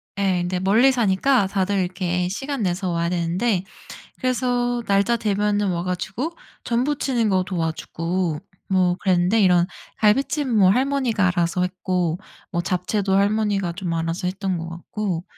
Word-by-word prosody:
네. 190 -3 +1
근데 180 +1 -2
멀리 220 +8 +4
사니까 235 0 +2
다들 195 0 0
이렇게 180 -1 -1
시간 270 +3 -3
내서 180 0 -1
와야 170 0 0
되는데 180 +3 0 0.5
그래서 245 -1 0
날짜 200 +4 +2
되면은 205 -2 0
와 170 -1 -2
가지고 190 - -3 0.3
전 240 +1 0
부치는 265 -6 0
거 190 -2 +2
도와주고 165 -1 -2 0.3
뭐 185 -2 +2
그랬는데 185 +3 +2
이런 180 -2 +4 0.3
갈비찜은 225 -3 +3
할머니가 255 -5 +1
알아서 175 0 0
했고 180 -2 -1 0.3
뭐 170 0 0
잡채도 190 +2 -1
할머니가 200 -3 +1
좀 175 -1 -4
알아서 165 +3 -2
했던 190 -1 -2
것 165 +1 -5
같고, 175 +1 -4
190 Hz, 310 characters per minute, -22 LUFS, 180-220 Hz, 0.5 s, 멀리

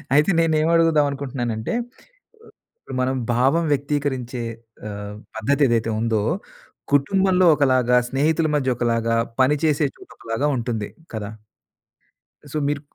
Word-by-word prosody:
అయితే 150 +7 +4
నేనేం 160 -1 +2
అడుగుదాం 165 -3 +4
అనుకుంటున్నానంటే 125 - -3 1.1
ఇప్పుడు - - -9
మనం 130 +1 0 0.2
భావం 135 +8 +2
వ్యక్తీకరించే 135 -4 -2 0.5
ఆహ్, 105 0 -7 0.2
పద్ధదేదైతే 120 -1 +1
ఉందో 115 -2 +1 0.7
కుటుంబంలో 185 +5 +3
ఒకలాగా, 130 -3 +3
స్నేహితుల 155 +4 +1
మధ్యొకలాగా, 120 -4 0 0.3
పని 140 +3 +4
చేసే 150 -1 +2
చోటొకలాగా 115 +6 -4
ఉంటుంది. 115 -3 -3 0.3
కదా? 105 -1 -4 1.2
సో - - -4
మీరు 145 -1 -1
135 Hz, 100 wpm, -22 LUFS, 115-150 Hz, 1.2 s, అయితే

